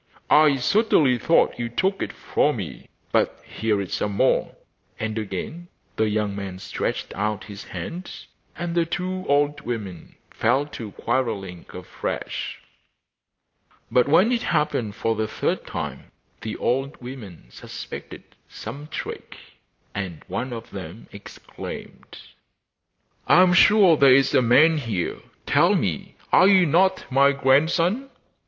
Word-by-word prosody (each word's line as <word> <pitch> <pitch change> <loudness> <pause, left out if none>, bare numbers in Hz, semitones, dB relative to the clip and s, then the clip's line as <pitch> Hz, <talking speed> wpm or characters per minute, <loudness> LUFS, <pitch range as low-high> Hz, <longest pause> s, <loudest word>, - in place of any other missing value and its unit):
'I 150 -2 +6
certainly 145 - +3
thought 165 - +2
you 120 -1 -2
took 190 - 0
it - - -2
from - - 0
me; - - -7 0.2
but - - +1
here 110 -2 -1
is 95 -2 -4
some 105 - -1
more.' - - +1 0.4
And 110 -1 -3
again 110 - -6 0.3
the 110 -1 +1
young 105 -1 -1
man 100 -2 -6
stretched 95 - -4
out 105 -1 -2
his 100 -1 -10
hand; 180 +2 -6 0.5
and 170 0 -3
the 170 -1 +1
two 185 +2 -3
old 145 +1 +2
women 105 -8 -6 0.2
fell 130 +5 +1
to 115 -8 -8
quarrelling 110 -8 -3
afresh. - - -5 1.3
But 125 +1 +4
when 185 +10 +4
it 240 -2 +1
happened 150 -9 0
for 115 0 0
the 110 0 -2
third - - -2
time - - -6 0.3
the 110 - -5
old 135 +3 -1
women 120 - -10
suspected - - -9 0.3
some 140 +7 -8
trick, 160 - -7 0.6
and 95 -5 -5
one 130 +1 -3
of 115 -1 -7
them 95 +2 -9
exclaimed: 100 0 -10 1.1
'I 180 - +7
am 180 -1 +4
sure 195 -1 +6
there 135 -2 +7
is 135 0 +3
a - - +5
man 150 +7 +5
here; 110 -9 -3 0.3
tell - - +4
me, - - -2 0.2
are 185 - +6
you 190 -2 +6
not 185 +5 +2
my 140 +2 +5
grandson? 165 - +2
130 Hz, 135 wpm, -23 LUFS, 110-165 Hz, 1.3 s, I